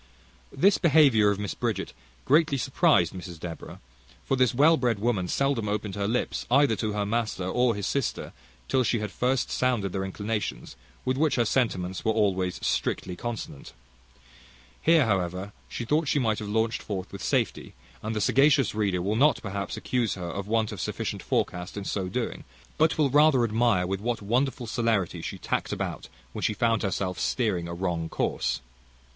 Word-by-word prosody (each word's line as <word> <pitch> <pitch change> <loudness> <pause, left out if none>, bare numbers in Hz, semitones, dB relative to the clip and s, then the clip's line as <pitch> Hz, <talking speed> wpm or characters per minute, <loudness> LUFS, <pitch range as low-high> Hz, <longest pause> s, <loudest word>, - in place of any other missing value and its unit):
This 195 +2 +3
behaviour 140 - +5
of 100 - 0
Mrs 100 -1 -5
Bridget - - -2 0.3
greatly 150 0 +3
surprised 130 - +2
Mrs 90 -3 -8
Deborah; 85 -1 -8 0.5
for 135 - +1
this 130 -2 +3
well 150 +6 +5
bred 125 -6 0
woman 105 -4 0
seldom 135 -2 0
opened 105 -1 -2
her 100 +1 -2
lips, 120 +3 -2
either 135 -2 +4
to 110 -1 -2
her 105 -1 -1
master 110 -2 -1
or 120 +5 +2
his 100 -2 -3
sister, 140 -4 -2 0.3
till 130 - +2
she 120 - +1
had 105 -2 -4
first 125 +3 0
sounded 120 -7 0
their 95 +1 -2
inclinations, 105 - -4 0.3
with 130 0 0
which 155 +1 +2
her 120 - +2
sentiments 95 -7 0
were 110 - +2
always 95 -4 0 0.6
consonant. 115 - -6 1.1
Here, 160 -3 +5
however, 95 -1 -1 0.2
she 120 - -5
thought 150 +5 +1
she 145 - +1
might 110 -6 +1
have 105 - -5
launched 110 +1 0
forth 95 -2 -5
with 100 - -8
safety; - - -1 0.3
and 110 +1 -3
the 105 - -1
sagacious 135 +4 +4
reader 100 -4 0
will 100 +3 0
not 145 +6 +4
perhaps 100 -2 -4
accuse 120 -4 -1
her 90 -2 -5
of 100 +4 -5
want 110 0 +1
of 100 -5 -6
sufficient - - -3
forecast 90 +3 -2
in 100 - -4
so 95 -2 -2
doing, - - -3 0.4
but 160 +1 +3
will 145 -4 +2
rather 145 -3 +5
admire 115 -4 +2
with 95 +1 -3
what 120 +1 -1
wonderful 125 +4 0
celerity 115 -5 0
she - - -5
tacked - - -2
about, - - -4 0.2
when - - -5
she 105 - 0
found 115 -2 +1
herself 95 -2 -2
steering 100 -9 0
a 85 - -5
wrong 85 -2 -2
course. - - -1
110 Hz, 175 wpm, -27 LUFS, 95-130 Hz, 1.1 s, behaviour